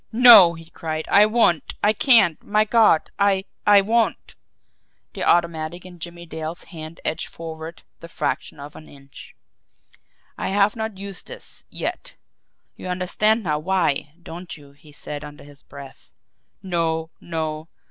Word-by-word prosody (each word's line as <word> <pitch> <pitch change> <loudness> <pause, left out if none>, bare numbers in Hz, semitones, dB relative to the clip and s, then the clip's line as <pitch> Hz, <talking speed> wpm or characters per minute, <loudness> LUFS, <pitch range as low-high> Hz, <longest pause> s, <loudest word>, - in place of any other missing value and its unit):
"NO!" 220 -7 +8
he 165 0 -12
cried. 160 -1 -5
"I 205 +1 +6
won't 215 - +1
I 210 +1 +4
can't 220 - +4
my 215 +1 +1
God! 215 -7 +3
I 195 -1 +2 0.2
I 205 -1 +7
WON'T!" 225 +3 0 0.8
The - - -5
automatic 170 0 0
in 180 -1 -13
Jimmie 170 +1 -9
Dale's 160 +1 -7
hand 160 -2 -10
edged 160 - -2
forward 160 0 -9 0.2
the 165 - -10
fraction - - -4
of 145 +1 -10
an 155 - -13
inch. 140 -1 -15 1.0
"I - - -2
have 200 +2 +2
not 220 -3 -5
used 195 -1 -6
this 485 - -11
yet. - - -5 0.6
You - - -9
understand 210 +5 0
now 150 -4 -1
why 160 -4 -1
don't 175 0 -9
you?" 145 -2 -17
he 150 +2 -19
said 145 0 -8
under 145 0 -11
his 145 0 -16
breath. 140 -2 -13 0.5
"No, 165 -3 -2
no!" 160 -2 -4
170 Hz, 145 wpm, -22 LUFS, 155-200 Hz, 1.0 s, NO